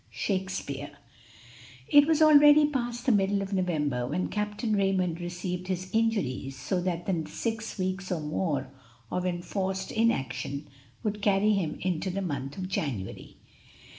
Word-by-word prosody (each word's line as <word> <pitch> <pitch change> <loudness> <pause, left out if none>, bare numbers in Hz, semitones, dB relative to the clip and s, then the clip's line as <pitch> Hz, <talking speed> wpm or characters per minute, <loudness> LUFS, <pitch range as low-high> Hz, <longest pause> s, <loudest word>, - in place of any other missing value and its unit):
Shakspeare. 185 -8 -3 0.9
It 290 0 +7
was 320 -1 +4
already 295 0 +8
past 240 -4 -2
the 260 - +4
middle 200 -1 +2
of 195 +1 -5
November 150 -9 0
when 180 - -1
Captain 210 +1 -1
Raymond 185 -4 +1
received 180 +1 -4
his 185 0 -3
injuries, 180 - 0
so 180 +7 -1
that 175 -1 -2
the 165 -5 -1
six 225 +6 -3
weeks 185 0 -2
or 175 - 0
more 150 -3 -2 0.4
of 180 0 -1
enforced 190 +2 -2
inaction 140 - -1 0.4
would 210 -1 -2
carry 205 +1 +3
him 170 -7 -1
into 185 0 -1
the 195 +2 -2
month 140 -5 -4
of 185 -1 -3
January. 130 - -4
185 Hz, 140 wpm, -28 LUFS, 160-210 Hz, 0.9 s, already